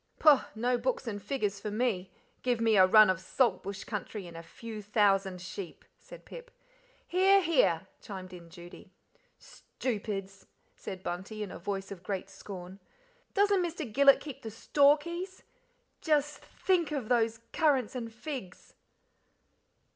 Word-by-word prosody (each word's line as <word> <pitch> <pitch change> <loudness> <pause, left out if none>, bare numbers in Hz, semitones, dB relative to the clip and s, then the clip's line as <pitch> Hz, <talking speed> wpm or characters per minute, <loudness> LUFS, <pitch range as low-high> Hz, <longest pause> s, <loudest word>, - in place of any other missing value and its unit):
"Pooh! 295 -4 +7 0.2
no 245 +2 +1
books 260 +2 -1
and 205 -3 -4
figures 205 -2 -2
far 210 +1 -5
me; 210 -5 -1 0.3
give 245 -2 0
me 225 -1 +3
a 185 -2 +7
run 215 +2 +8
of 185 -2 +1
Salt 240 +6 +1
Bush 200 +1 -6
country, 210 -1 -5
and 170 -1 -11
a 165 - -7
few 215 +6 -9
thousand 195 -3 +2
sheep," 185 -1 -8
said - - -13
Pip. - - -10 0.6
"Hear! 385 +2 +5
hear!" 250 - +2 0.2
chimed 185 -3 -8
in 170 -2 -11
Judy. 175 +1 -12 0.5
"Stoopids!" 200 -5 -5 0.3
said 190 -2 -8
Bunty, 190 +5 -4
in 200 - -7
a - - -8
voice 195 +1 -4
of 190 -3 -8
great 190 0 -4
scorn. 185 -1 -9 0.6
"Doesn't 405 -1 +4
Mr. 335 -2 -3
Gillet 280 +1 +7
keep 290 -4 -8
the 225 - -6
store 280 +6 +4
keys 345 +5 -7 0.6
just 295 -2 +1
think 360 -5 0
those 230 -5 0
currants 275 -7 +2
and 235 -3 -5
figs." 240 - -8
220 Hz, 145 wpm, -30 LUFS, 195-280 Hz, 0.6 s, run